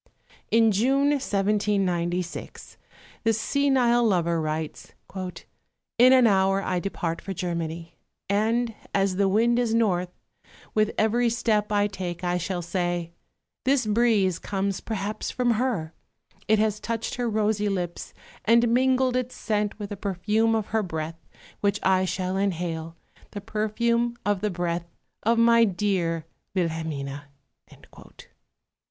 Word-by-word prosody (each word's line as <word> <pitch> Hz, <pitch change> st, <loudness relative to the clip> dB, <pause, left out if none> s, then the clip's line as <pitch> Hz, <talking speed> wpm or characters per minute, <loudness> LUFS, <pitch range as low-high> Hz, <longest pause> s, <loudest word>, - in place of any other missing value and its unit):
In 225 Hz, 0 st, +4 dB
June, 270 Hz, +8 st, +2 dB
1796, 195 Hz, -8 st, -1 dB, 0.5 s
this 225 Hz, -1 st, +2 dB
senile 255 Hz, -2 st, +2 dB
lover 170 Hz, -6 st, +2 dB
writes, 155 Hz, 0 st, -4 dB, 0.2 s
"In 190 Hz, +6 st, -1 dB
an 260 Hz, -2 st, +6 dB
hour 195 Hz, -2 st, +3 dB
I 185 Hz, -2 st, -1 dB
depart 170 Hz, -3 st, -3 dB
for 195 Hz, -, -5 dB
Germany; 170 Hz, -2 st, -4 dB, 0.3 s
and, 225 Hz, +4 st, +1 dB, 0.2 s
as 195 Hz, -2 st, +1 dB
the 195 Hz, -1 st, +3 dB
wind 235 Hz, +4 st, +3 dB
is 230 Hz, -2 st, +1 dB
north, 185 Hz, -6 st, +1 dB, 0.6 s
with 215 Hz, 0 st, +2 dB
every 235 Hz, +2 st, +2 dB
step 215 Hz, -2 st, 0 dB
I 205 Hz, -1 st, +3 dB
take 185 Hz, -3 st, -5 dB
I 180 Hz, 0 st, 0 dB
shall 175 Hz, 0 st, -3 dB
say: 175 Hz, -1 st, -2 dB, 0.5 s
'This 265 Hz, -2 st, +2 dB
breeze 210 Hz, -5 st, +2 dB
comes 195 Hz, -1 st, -2 dB
perhaps 215 Hz, 0 st, -3 dB
from 250 Hz, -1 st, +1 dB
her; 220 Hz, -9 st, -1 dB, 0.5 s
it 220 Hz, -, +4 dB
has 210 Hz, -1 st, +1 dB
touched 230 Hz, +1 st, -3 dB
her 245 Hz, -1 st, -1 dB
rosy 210 Hz, -1 st, +1 dB
lips 180 Hz, -3 st, -4 dB, 0.3 s
and 235 Hz, +1 st, +4 dB
mingled 255 Hz, +1 st, +2 dB
its 255 Hz, 0 st, -2 dB
scent 210 Hz, -2 st, -1 dB
with 205 Hz, -2 st, -6 dB
the 205 Hz, -, -4 dB
perfume 210 Hz, +4 st, +1 dB
of 220 Hz, -2 st, -2 dB
her 220 Hz, -, +3 dB
breath 160 Hz, -3 st, -5 dB, 0.3 s
which 200 Hz, -1 st, +1 dB
I 185 Hz, 0 st, +3 dB
shall 185 Hz, +1 st, -2 dB
inhale, 165 Hz, -4 st, -2 dB, 0.3 s
the 205 Hz, -, -7 dB
perfume 235 Hz, +3 st, 0 dB
of 205 Hz, -2 st, +1 dB
the 210 Hz, -, 0 dB
breath 175 Hz, -2 st, -2 dB, 0.3 s
of 230 Hz, +2 st, +2 dB
my 230 Hz, 0 st, +6 dB
dear 180 Hz, -5 st, 0 dB, 0.3 s
Wilhelmine.'" 160 Hz, -5 st, -2 dB
205 Hz, 130 wpm, -25 LUFS, 180-230 Hz, 0.6 s, an